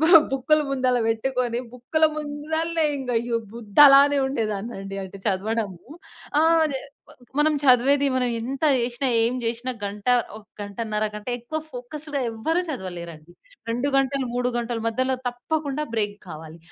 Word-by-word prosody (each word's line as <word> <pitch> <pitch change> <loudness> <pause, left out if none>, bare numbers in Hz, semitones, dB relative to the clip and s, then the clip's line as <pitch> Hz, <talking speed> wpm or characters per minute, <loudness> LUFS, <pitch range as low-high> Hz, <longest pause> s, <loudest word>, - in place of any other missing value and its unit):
బ - - +5 0.3
బుక్కులు 300 +3 +2
ముందల 255 -2 +1
పెట్టుకొని 240 +1 -1 0.2
బుక్కుల 315 +6 +1
ముందలనే 315 +2 -1
ఇంగా 250 -2 -3
అయ్యో! 235 0 -1 0.2
బుద్ధలానే 275 +6 +6
ఉండేదాన్నండి. 215 -5 -3
అంటే, 190 +1 -10
చదవడము. 200 -1 -2 0.6
ఆహ్, 325 0 +4 0.7
మనం 305 +1 +4
చదివేది 275 +2 +5
మనం 255 -1 +1
ఎంత 265 +6 -3
జేసినా, 245 +2 0 0.2
ఏం 240 - +1
జేసినా 235 +2 -2
గంట, 205 +1 -5 0.3
ఒక 215 - -12 0.2
గంటన్నర 210 +1 -2
కంటే 210 +3 -6
ఎక్కువ 245 +7 -4
ఫోకస్‌గా 285 +4 -5
ఎవ్వరు 320 +11 -1
చదవలేరండి. 175 - -7 0.4
2 245 +4 0
గంటలు, 270 0 +1
3 245 0 +1
గంటల 235 0 -2
మధ్యలో 255 +3 0
తప్పకుండా 285 +4 -3
బ్రేక్ 205 -2 -1
కావాలి. 160 0 -9
245 Hz, 130 wpm, -24 LUFS, 220-280 Hz, 0.7 s, బుద్ధలానే